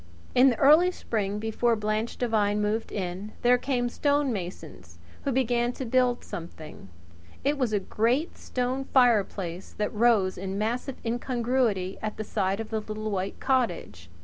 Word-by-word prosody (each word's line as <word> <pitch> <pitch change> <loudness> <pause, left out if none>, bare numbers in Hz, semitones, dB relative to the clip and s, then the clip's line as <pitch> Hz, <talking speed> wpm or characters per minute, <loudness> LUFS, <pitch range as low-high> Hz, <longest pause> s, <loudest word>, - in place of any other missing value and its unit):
In 255 +2 +6
the 245 - +1
early 310 +6 +6
spring, 210 - -2
before 225 +2 +1
Blanche 215 +1 -2
Devine 210 -4 +1
moved 210 +2 -1
in, 190 +2 -4
there 245 +1 +5
came 245 -3 0
stonemasons, 205 - -2 0.3
who 280 - +1
began 245 -1 +1
to 265 - -5
build 250 0 +2
something. 165 - -9 0.5
It 285 +2 +2
was 255 -6 0
a 210 - +2
great 235 - 0
stone 255 +2 -2
fireplace 200 -9 +1
that 210 - -1
rose 210 -5 +3
in 190 +1 -4
massive 240 +5 -2
incongruity 235 -5 0
at 215 -1 -4
the 215 - -3
side 195 -1 -1
of 225 0 -6
the 220 - 0
little 215 0 -5
white 195 0 -3
cottage. 175 - -1
225 Hz, 150 wpm, -27 LUFS, 200-250 Hz, 0.5 s, In